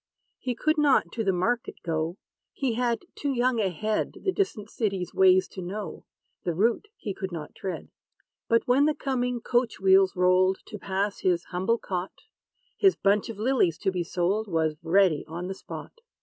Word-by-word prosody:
He 250 -2 -2
could 310 +5 +1
not 290 -3 +3
to 225 - -2
the 195 - +2
market 230 +7 -1
go: 165 +1 -2 0.4
He 265 -4 -1
had 240 +5 -1
too 285 - -2
young 245 -1 +1
a 200 -3 +2
head, 215 +4 -2
The 380 - +2
distant 270 - -2
city's 195 -5 -2
ways 185 0 +5
to 190 - -8
know; 200 +4 -6 0.4
The 175 - -1
route 230 - +1
he 200 - -4
could 190 0 -5
not 160 -3 -6
tread. 190 -2 -6 0.6
But, 230 0 +2
when 265 +4 +4
the 305 0 +2
coming 250 -3 -1
coach 240 -2 0
wheels 190 0 +5
rolled 185 +1 +4
To 210 - -8
pass 195 +2 -2
his 175 -2 +1
humble 190 +6 +1
cot, 185 -3 -4 0.6
His 390 -2 +5
bunch 200 +2 +2
of 225 - -6
lilies 215 - +2
to 190 - 0
be 180 -2 -1
sold 185 +6 0
Was 160 -4 0
ready 175 -2 +3
on 170 +3 -5
the 190 - -3
spot. 465 - -10
200 Hz, 180 wpm, -27 LUFS, 180-240 Hz, 0.6 s, ways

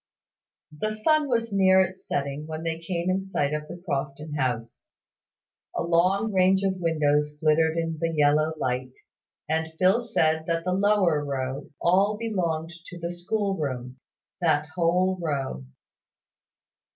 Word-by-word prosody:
The 215 +8 -2
sun 300 +6 +2
was 230 -3 0
near 190 -1 +5
its 185 0 -1
setting 140 +2 -2
when 160 0 -5
they 165 -1 -2
came 170 +1 -3
in 185 +1 +1
sight 150 -7 -1
of 150 0 -3
the 175 - -8
Crofton 145 0 -3
house. 125 -5 -3 0.8
A - - 0
long 185 +6 +2
range 190 +1 +4
of 190 -1 0
windows 150 -2 +1
glittered 160 +1 +3
in 165 -1 -2
the 165 +1 0
yellow 155 0 +3
light, 130 -2 -3 0.5
and 160 +1 -1
Phil 190 +7 +4
said 160 -9 +1
that 165 -1 0
the 180 +1 0
lower 190 -6 +3
row 135 0 -4
all 195 +4 +3
belonged 170 -8 -2 0.2
to 175 - -9
the 170 0 -4
school 195 +3 -1
room; 130 -5 -4 0.4
that 155 -3 +1
whole 180 +2 +1
row. 135 - -3
165 Hz, 145 wpm, -26 LUFS, 150-190 Hz, 0.8 s, near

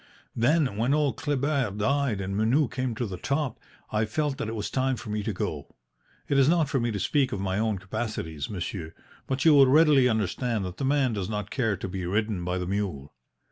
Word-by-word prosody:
Then 130 -2 +2
when 125 +6 +2
old 145 -6 +1
Kleber 140 -3 0
died 110 +2 0
and 95 0 -3
Menou 120 +8 +3
came 130 -2 -2
to 120 - -2
the 95 -4 -6
top, 140 +2 -1 0.3
I 110 +1 +1
felt 145 +5 -2
that 130 - -2
it 110 - -4
was 105 -2 -4
time 130 0 +1
for 110 -2 -7
me 105 0 -1
to 105 - -2
go. 80 -6 -5 0.5
It 140 - +2
is 135 +1 +5
not 165 -3 +3
for 135 - +1
me 120 0 0
to 105 -3 -2
speak 135 - +1
of 100 - -3
my 95 0 -1
own 110 -2 0
capacities, 95 -6 -4
monsieur, 90 -4 -5 0.3
but 130 +1 -1
you 160 - +8
will 140 -2 +7
readily 145 -2 +5
understand 110 0 -1
that 90 0 -6
the 135 - -2
man 135 -3 +2
does 100 -2 -3
not 105 -1 -4
care 110 -7 0
to 95 - -5
be 95 0 -5
ridden 105 -1 -1
by 90 +1 -1
the 90 - -2
mule. 95 -8 -3
110 Hz, 220 wpm, -27 LUFS, 100-135 Hz, 0.5 s, you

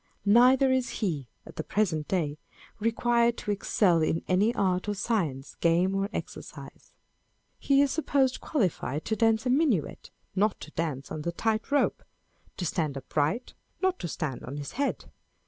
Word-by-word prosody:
Neither 250 +5 +6
is 260 -1 +1
he 150 -10 -1 0.2
(at - - -13
the 160 - -2
present 165 -8 0
day) 155 -6 -1 0.4
required 235 +1 +2
to 210 - -3
excel 190 -3 +2
in 160 +1 0
any 195 +5 +3
art 185 0 0
or 205 - -1
science, 175 - -2
game 170 +3 +3
or 195 +1 0
exercise. - - -8 0.7
He 275 0 +4
is 280 - 0
supposed 275 -5 +1
qualified 180 - -1
to 220 - 0
dance 225 0 +2
a 250 - +2
minuet, 260 - +1 0.3
not 205 +1 +1
to 155 - -9
dance 150 -5 -3
on 155 - -4
the 170 - -2
tight 220 +6 -1
rope 285 0 +1
â€" - - -37
to 180 - -3
stand 155 -4 -1
upright, 150 - -1 0.3
not 375 -1 +1
to - - -3
stand 150 -4 -4
on 135 +4 -6
his 145 -1 -6
head. 280 +2 -2
200 Hz, 165 wpm, -28 LUFS, 160-235 Hz, 0.7 s, Neither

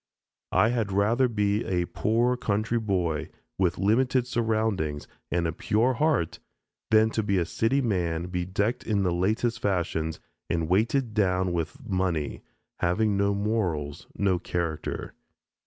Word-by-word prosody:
I 95 +5 +5
had 115 -4 -1
rather 110 +6 +3
be 105 -1 0
a 90 -2 0
poor 120 +7 +1
country 115 -1 0
boy 90 -8 -1 0.3
with 90 -2 +2
limited 125 +5 +2
surroundings 110 -11 -1 0.2
and 85 -1 0
a 80 - +1
pure 115 +9 +1
heart 145 - +1 0.5
than 110 0 +5
to 110 - 0
be 100 -2 0
a 85 - +2
city 115 +10 +1
man 85 -8 0
bedecked 95 +6 -1
in 105 -3 +1
the 90 -2 +1
latest 110 +6 0
fashions 85 -5 -1 0.3
and 85 -1 0
weighted 110 - +1
down 95 -3 +1
with 85 - -4
money, 90 -7 -1 0.4
having 100 +4 +2
no 100 0 +2
morals, 95 -9 -2
no 95 -3 +1
character. 85 -3 -3
100 Hz, 140 wpm, -27 LUFS, 90-110 Hz, 0.5 s, I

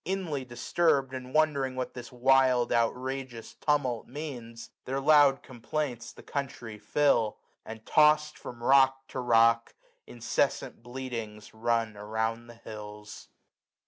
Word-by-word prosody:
Inly 170 -8 -3
disturbed, 135 +2 0
and 130 -1 -7
wondering 140 -4 +1
what 130 -1 -4
this 120 -2 -9
wild 130 0 +3
390 - - +1 0.2
Outrageous 130 -2 -6
tumult 140 -6 -1
means, 125 -5 -8
their 135 +1 -2
loud 145 -1 +5
complaints 125 0 -4
The - - -15
country 120 -6 -5
fill; 120 -7 +1 0.3
and, 110 0 -10
toss*d 150 0 +4
from 120 -1 -9
rock 135 0 +4
to - - -5
rock. 115 -1 +3 0.3
Incessant 115 -1 -2
bleatings 115 -4 -7
run 115 -1 -1
around 110 +3 -3
the 120 - -12
hills. 105 -1 -10
125 Hz, 125 wpm, -29 LUFS, 115-135 Hz, 0.3 s, loud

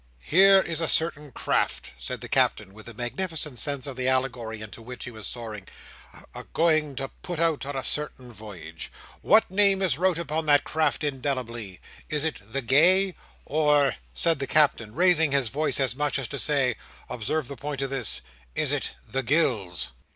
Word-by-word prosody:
"Here 195 +3 +6
is 170 -2 -3
a 165 - 0
certain 150 -3 +1
craft," - - -1
said - - -6
the - - -6
Captain, 95 - +1
with 110 +2 -12
a 115 - -9
magnificent 150 - -2
sense 140 -3 -1
of 140 -2 -6
the 130 0 -2
allegory 125 -4 -1
into 110 +1 -9
which 125 +2 -8
he 125 - -6
was 110 -3 -7
soaring, 110 -5 -6 0.7
"a - - -7
going 155 -3 +2
to 135 +1 -4
put 175 -2 -5
out 160 -4 +1
on 145 - -4
a 135 - -2
certain 130 -5 -2
voyage. 90 -7 -9 0.3
What 215 -2 +4
name 200 0 +5
is 160 -7 +2
wrote 185 -2 +2
upon 160 -1 -3
that 145 -1 +5
craft 160 0 0
indelibly? 125 -8 -3 0.3
Is 150 -1 -1
it 160 -8 -2
The 135 +2 -2
Gay? 180 +9 +4 0.3
or," 150 -1 +2
said 165 -3 +1
the 135 - -3
Captain, 130 -8 +2
raising 165 -5 +4
his 135 -5 +1
voice 150 +4 0
as 130 -3 0
much 145 -1 0
as 135 -3 -3
to 140 - -4
say, 135 -6 +1 0.3
observe 125 +5 -2
the 140 - -7
point 140 +1 -4
of 135 - -3
this, 110 - -1 0.3
"is - - +2
it - - -1
The 135 - -1
Gills?" 115 - 0
140 Hz, 185 wpm, -26 LUFS, 120-155 Hz, 0.7 s, Here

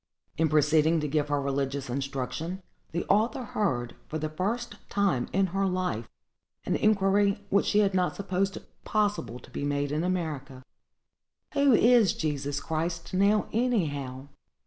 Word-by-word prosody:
In 160 +1 +2
proceeding 155 +2 +4
to 150 - -1
give 150 0 0
her 145 -1 0
religious 140 0 -2
instruction, 140 +7 -4 0.3
the 170 - -2
author 220 +5 +2
heard, 130 - -1
for 155 - -3
the 155 0 -3
first 210 +7 -3
time 195 -12 +1
in 195 +1 +2
her 195 0 +1
life, 180 - -2 0.6
an - - 0
inquiry 200 -1 +2
which 200 - +3
she 210 - +4
had 200 -2 +2
not 180 -1 +1
supposed 195 0 -1 0.3
possible 205 - 0
to - - -16
be - - -4
made 145 0 -1
in 155 +2 0
America:—"Who 170 - -3
is 230 -4 +5
Jesus 145 -2 -2
Christ, 165 +3 -3
now, 200 +3 +3
anyhow?" 145 - -1
170 Hz, 145 wpm, -28 LUFS, 140-200 Hz, 0.6 s, is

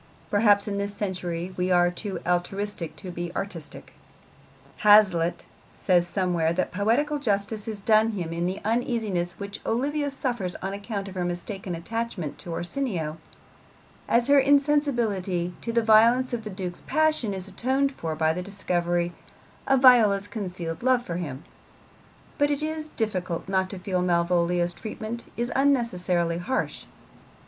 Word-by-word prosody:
Perhaps 205 -1 +4
in 200 -1 -2
this 200 0 -3
century 180 -3 -3
we 180 0 -1
are 175 -1 +4
too 195 +2 -5
altruistic 180 +1 -2
to 185 -3 -8
be 175 0 -4
really 170 - -8
artistic. 180 -6 -6 0.8
Hazlitt 195 -5 +5 0.3
says 175 -2 +2
somewhere 175 -3 +1
that 185 - -1
poetical 245 +10 +1
justice 210 -3 -1
is 215 -2 -5
done 220 +2 +4
him 170 -5 -3
in 170 +1 -1
the 185 +2 -3
uneasiness 220 -7 0
which 200 0 -7
Olivia 285 +5 0
suffers 240 -9 -3
on 195 +1 -4
account 200 0 -4
of 195 - -8
her 185 -1 -2
mistaken 175 +1 -4
attachment 215 -3 -4
to - - -9
Orsino, 175 - -2 0.9
as 235 0 +3
her 285 +1 +6
insensibility 240 - +2
to 230 - -3
the 230 0 +2
violence 230 +4 +5
of 230 -2 -2
the - - -4
Duke's 185 -3 -6
passion 310 -8 +2
is 190 -1 -5
atoned 265 +7 0
for 165 - -4
by 160 0 +2
the 180 - -3
discovery 175 -3 -1 0.5
of 270 -1 +3
Viola's 215 -6 +6
concealed 180 -7 -5
love 250 -1 +2
for 170 - -3
him; 145 -6 -5 1.0
but 290 0 +4
it 290 +1 -1
is 310 0 -3
difficult 185 - -3
not 190 -1 +1
to 195 - -6
feel 185 -1 -1
Malvolio's 175 0 +1
treatment 220 +3 -7
is 240 +1 -1
unnecessarily 180 -11 +1
harsh. 260 +9 -2
200 Hz, 150 wpm, -26 LUFS, 175-235 Hz, 1.0 s, her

